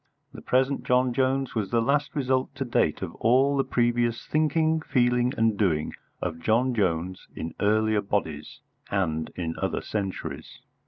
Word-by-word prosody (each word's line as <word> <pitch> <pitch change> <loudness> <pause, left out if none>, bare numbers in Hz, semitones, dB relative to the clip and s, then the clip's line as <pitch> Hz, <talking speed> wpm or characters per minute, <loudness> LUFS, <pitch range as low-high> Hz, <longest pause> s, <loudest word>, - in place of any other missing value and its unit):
The - - -9
present 130 +2 +1
John 125 0 +2
Jones 135 +1 0
was 105 -4 -2
the 120 - +2
last 140 +6 0
result 130 -2 0
to 135 - -3
date 120 - +1
of - - -5
all 135 +4 +3
the 135 - +2
previous 120 -1 0
thinking, 155 +1 +1
feeling, 125 -3 +2
and 115 -1 +2
doing 80 -7 0 0.3
of 80 -2 -3
John 115 +9 +2
Jones 90 -4 -1
in 80 - -5
earlier 110 0 +2
bodies 80 -7 -3 0.3
and 80 -5 -1
in 80 -2 -3
other - - -1
centuries. 90 -8 -5
120 Hz, 155 wpm, -26 LUFS, 95-130 Hz, 0.3 s, all